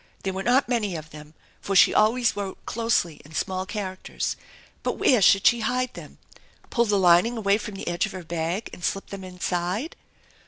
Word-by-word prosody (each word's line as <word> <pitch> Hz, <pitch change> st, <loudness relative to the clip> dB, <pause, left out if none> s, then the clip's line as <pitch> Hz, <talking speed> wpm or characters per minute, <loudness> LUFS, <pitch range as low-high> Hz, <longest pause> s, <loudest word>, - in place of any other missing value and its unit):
There 190 Hz, -, -2 dB
were 190 Hz, -, -3 dB
not 250 Hz, +6 st, +3 dB
many 220 Hz, -7 st, -1 dB
of 155 Hz, -1 st, -8 dB
them, 150 Hz, +1 st, -12 dB, 0.3 s
for 195 Hz, -, -2 dB
she -, -, +7 dB
always 230 Hz, +2 st, +3 dB
wrote 200 Hz, -2 st, -6 dB
closely 225 Hz, -8 st, 0 dB
in 155 Hz, +2 st, -14 dB
small 190 Hz, -1 st, -2 dB
characters. 190 Hz, -3 st, -4 dB, 0.5 s
But -, -, -2 dB
where 250 Hz, -5 st, +4 dB
should 195 Hz, +1 st, +5 dB
she 240 Hz, -, +5 dB
hide 250 Hz, +3 st, -1 dB
them? -, -, -11 dB, 0.5 s
Pull 235 Hz, 0 st, +2 dB
the 205 Hz, -2 st, +2 dB
lining 185 Hz, +6 st, +4 dB
away 200 Hz, -1 st, +2 dB
from 210 Hz, -1 st, -7 dB
the -, -, -7 dB
edge 175 Hz, +4 st, 0 dB
of -, -, -9 dB
her 185 Hz, -2 st, -7 dB
bag 170 Hz, +5 st, -3 dB
and 175 Hz, -, -11 dB
slip 195 Hz, -, -2 dB
them 195 Hz, -1 st, -7 dB
Inside? 180 Hz, -, -3 dB
195 Hz, 195 wpm, -25 LUFS, 180-225 Hz, 0.5 s, she